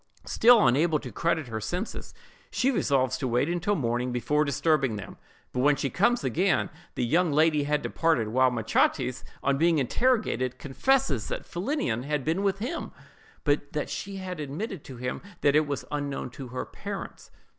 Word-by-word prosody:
Still 235 Hz, -1 st, +6 dB
unable 150 Hz, +6 st, +3 dB
to 130 Hz, -4 st, -8 dB
credit 160 Hz, +5 st, 0 dB
her 110 Hz, -1 st, -4 dB
senses, 180 Hz, -, -4 dB, 0.4 s
she 265 Hz, +2 st, +1 dB
resolves 130 Hz, -, +1 dB
to 130 Hz, -, -1 dB
wait 140 Hz, +9 st, 0 dB
till 205 Hz, +4 st, +1 dB
morning 125 Hz, -3 st, -1 dB
before 125 Hz, +5 st, +1 dB
disturbing 140 Hz, -4 st, +1 dB
them; 100 Hz, -, -8 dB, 0.4 s
but 125 Hz, -, -2 dB
when 145 Hz, +3 st, +4 dB
she 140 Hz, -, -2 dB
comes 240 Hz, +6 st, +2 dB
again 185 Hz, +3 st, +1 dB, 0.2 s
the 120 Hz, -, 0 dB
young 170 Hz, +6 st, +2 dB
lady 150 Hz, 0 st, +3 dB
had 150 Hz, 0 st, 0 dB
departed; 160 Hz, -10 st, +1 dB
while 130 Hz, +3 st, +4 dB
Machates, 125 Hz, +2 st, +1 dB, 0.2 s
on 140 Hz, 0 st, +1 dB
being 165 Hz, 0 st, +4 dB
interrogated, 135 Hz, -, +1 dB
confesses 145 Hz, -, +1 dB
that -, -, -4 dB
Philinnion 190 Hz, -, -2 dB
had 145 Hz, 0 st, -2 dB
been 165 Hz, +5 st, +1 dB
with 195 Hz, -1 st, +1 dB
him, 250 Hz, +11 st, -4 dB, 0.5 s
but 145 Hz, -1 st, 0 dB
that 150 Hz, -, -2 dB
she 200 Hz, 0 st, -5 dB
had 185 Hz, -3 st, -5 dB
admitted 155 Hz, -, -5 dB
to 130 Hz, -, -9 dB
him 125 Hz, +1 st, -4 dB, 0.2 s
that 145 Hz, 0 st, +4 dB
it 155 Hz, 0 st, +4 dB
was 140 Hz, -2 st, -3 dB
unknown 145 Hz, -3 st, -3 dB
to 130 Hz, +1 st, -8 dB
her 125 Hz, +1 st, -4 dB
parents. -, -, -7 dB
145 Hz, 175 wpm, -27 LUFS, 130-175 Hz, 0.5 s, Still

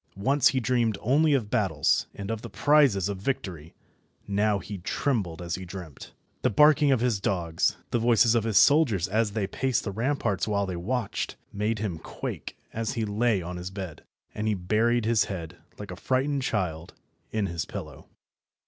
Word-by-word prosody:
Once 135 Hz, +6 st, +3 dB
he 135 Hz, -, +2 dB
dreamed 120 Hz, -3 st, +1 dB
only 145 Hz, +6 st, +3 dB
of 110 Hz, -6 st, -2 dB
battles, -, -, +2 dB
and 100 Hz, +2 st, -5 dB
of 110 Hz, -1 st, -3 dB
the -, -, -8 dB
prizes 140 Hz, -11 st, +3 dB
of 100 Hz, -2 st, -4 dB
victory, 95 Hz, -, -4 dB, 0.6 s
now 100 Hz, +1 st, +2 dB
he 100 Hz, +1 st, -7 dB
trembled 90 Hz, -, -2 dB
as 85 Hz, -1 st, -4 dB
he 95 Hz, -, -3 dB
dreamt. 90 Hz, -5 st, -9 dB, 0.3 s
The -, -, +2 dB
barking 150 Hz, +4 st, +5 dB
of 130 Hz, -4 st, +2 dB
his 120 Hz, -5 st, +1 dB
dogs, 85 Hz, -4 st, 0 dB
the 120 Hz, -, +1 dB
voices 115 Hz, 0 st, +4 dB
of 115 Hz, -2 st, +2 dB
his 110 Hz, -2 st, +1 dB
soldiers 130 Hz, -, +4 dB
as 105 Hz, +1 st, 0 dB
they 105 Hz, -2 st, 0 dB
paced 130 Hz, +6 st, -1 dB
the 100 Hz, -, -3 dB
ramparts 115 Hz, -3 st, -1 dB
while 100 Hz, -2 st, +1 dB
they 95 Hz, -2 st, -4 dB
watched, 110 Hz, +5 st, -2 dB, 0.2 s
made 105 Hz, +2 st, -1 dB
him 100 Hz, -6 st, -3 dB
quake -, -, -6 dB, 0.2 s
as 115 Hz, -1 st, -2 dB
he 115 Hz, -2 st, -1 dB
lay 105 Hz, -2 st, +1 dB
on 90 Hz, +1 st, -5 dB
his 90 Hz, +1 st, -5 dB
bed, 95 Hz, -5 st, -7 dB, 0.3 s
and 105 Hz, +1 st, -3 dB
he 105 Hz, -, +2 dB
buried 110 Hz, +5 st, +1 dB
his 115 Hz, -1 st, +3 dB
head, 90 Hz, -3 st, -6 dB, 0.2 s
like 100 Hz, -2 st, -8 dB
a -, -, -5 dB
frightened 135 Hz, +6 st, 0 dB
child, 90 Hz, -9 st, -2 dB, 0.4 s
in 110 Hz, -2 st, 0 dB
his 85 Hz, -3 st, -3 dB
pillow. -, -, -8 dB
105 Hz, 185 wpm, -27 LUFS, 95-120 Hz, 0.6 s, barking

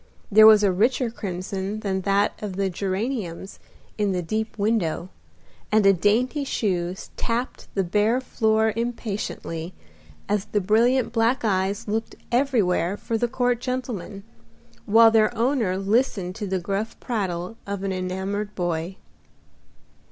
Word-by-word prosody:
There 215 Hz, +2 st, +9 dB
was 215 Hz, -1 st, +7 dB
a 200 Hz, -, +4 dB
richer 235 Hz, +5 st, +1 dB
crimson 195 Hz, 0 st, -4 dB
than 190 Hz, -2 st, -1 dB
that 200 Hz, +1 st, +2 dB
of 205 Hz, -3 st, -4 dB
the 195 Hz, 0 st, 0 dB
geraniums 195 Hz, -1 st, -3 dB, 0.4 s
in 205 Hz, -2 st, +1 dB
the 180 Hz, -1 st, -1 dB
deep 220 Hz, +5 st, -3 dB
window, 200 Hz, -5 st, 0 dB, 0.6 s
and 215 Hz, -1 st, +4 dB
a 195 Hz, -, +7 dB
dainty 230 Hz, -, +1 dB
shoe 185 Hz, -9 st, -1 dB, 0.2 s
tapped 235 Hz, +2 st, -3 dB
the 195 Hz, -, +2 dB
bare 210 Hz, +7 st, +2 dB
floor 220 Hz, -3 st, +1 dB
impatiently 210 Hz, -7 st, -4 dB, 0.5 s
as 205 Hz, 0 st, 0 dB
the 210 Hz, 0 st, 0 dB
brilliant 230 Hz, +6 st, +2 dB
black 230 Hz, +2 st, +1 dB
eyes 195 Hz, +2 st, 0 dB
looked 220 Hz, +2 st, -2 dB, 0.2 s
everywhere 205 Hz, -8 st, +1 dB
for 230 Hz, -, -3 dB
the 240 Hz, +2 st, +1 dB
court 245 Hz, -1 st, 0 dB
gentleman, 245 Hz, -6 st, -4 dB, 0.6 s
while 225 Hz, +2 st, +7 dB
their 220 Hz, +1 st, +3 dB
owner 230 Hz, -6 st, +1 dB
listened 195 Hz, -2 st, 0 dB
to 210 Hz, -2 st, -4 dB
the 190 Hz, 0 st, 0 dB
gruff 200 Hz, +5 st, -3 dB
prattle 190 Hz, -4 st, -3 dB
of 200 Hz, -1 st, -4 dB
an 195 Hz, -, -1 dB
enamored 190 Hz, +3 st, -3 dB
boy. 175 Hz, 0 st, -2 dB
210 Hz, 135 wpm, -24 LUFS, 190-230 Hz, 0.6 s, There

